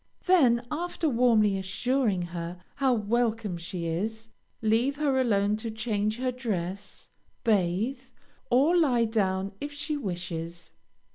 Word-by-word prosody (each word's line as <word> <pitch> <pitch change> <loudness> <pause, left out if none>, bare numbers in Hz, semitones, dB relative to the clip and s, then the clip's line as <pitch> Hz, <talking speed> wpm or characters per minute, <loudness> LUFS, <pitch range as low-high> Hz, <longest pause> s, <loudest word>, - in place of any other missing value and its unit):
Then, 255 -10 +4
after 335 +1 -2
warmly 230 -6 +3
assuring 200 +1 0
her 170 0 -6
how 270 -2 +2
welcome 225 -3 0
she 170 0 -5
is, 220 +7 -3 0.3
leave 225 +5 +2
her 280 -3 +1
alone 205 -3 +2
to 225 +1 -4
change 215 -1 -1
her 255 0 -1
dress, 200 -6 -4 0.4
bathe, 215 +3 +1 0.5
or 280 +8 +4
lie 260 -9 +3
down 195 -3 0
if 290 - -4
she 295 +1 -3
wishes. 175 - -5
220 Hz, 125 wpm, -28 LUFS, 190-255 Hz, 0.5 s, Then